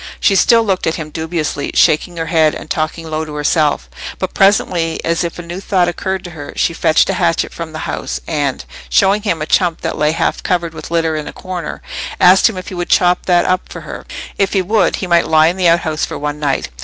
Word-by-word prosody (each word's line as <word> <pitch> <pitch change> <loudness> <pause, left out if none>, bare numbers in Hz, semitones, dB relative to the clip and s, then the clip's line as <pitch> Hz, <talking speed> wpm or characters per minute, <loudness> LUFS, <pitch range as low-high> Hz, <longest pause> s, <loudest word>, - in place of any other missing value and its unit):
She - - +3
still 230 +3 +5
looked 190 -5 -1
at 160 - +1
him 155 -2 -6
dubiously, 160 -3 -3
shaking 170 +3 +3
her 165 - -2
head 160 -2 +2
and - - -9
talking 160 +1 -2
low 155 0 -2
to 155 -1 -8
herself; 150 0 +1 0.3
but 185 - -4
presently, 175 -4 +2
as 165 +1 0
if 170 - -4
a 175 - -6
new 170 +2 -6
thought 190 -3 +1
occurred 190 +2 -3
to 175 - -8
her, 145 -3 -9
she 170 - +1
fetched 160 -1 +3
a 190 - -3
hatchet 170 -1 +1
from 165 -1 -6
the 155 0 -6
house, - - -4
and, 145 -4 -2 0.2
showing 200 +2 +3
him 170 -7 -1
a - - -2
chump 170 0 +1
that - - -3
lay 150 +1 +2
half 165 0 -1
covered 175 -2 -1
with - - -9
litter 165 -1 0
in 155 -1 -4
a - - -5
corner, 180 -4 -6 0.4
asked 185 +4 +6
him 210 - -7
if 185 - -6
he - - -8
would 175 -1 -4
chop 180 -1 +3
that 175 -1 +3
up 185 0 0
for - - -8
her: - - -8 0.4
if 195 -1 +1
he 195 - +3
would, 210 +1 +2
he - - -4
might 170 -1 +3
lie 155 0 +5
in 175 - -3
the 185 -2 +2
outhouse 165 -2 +1
for - - -3
one 150 0 -4
night. 140 -2 -1
170 Hz, 240 wpm, -16 LUFS, 155-185 Hz, 0.4 s, asked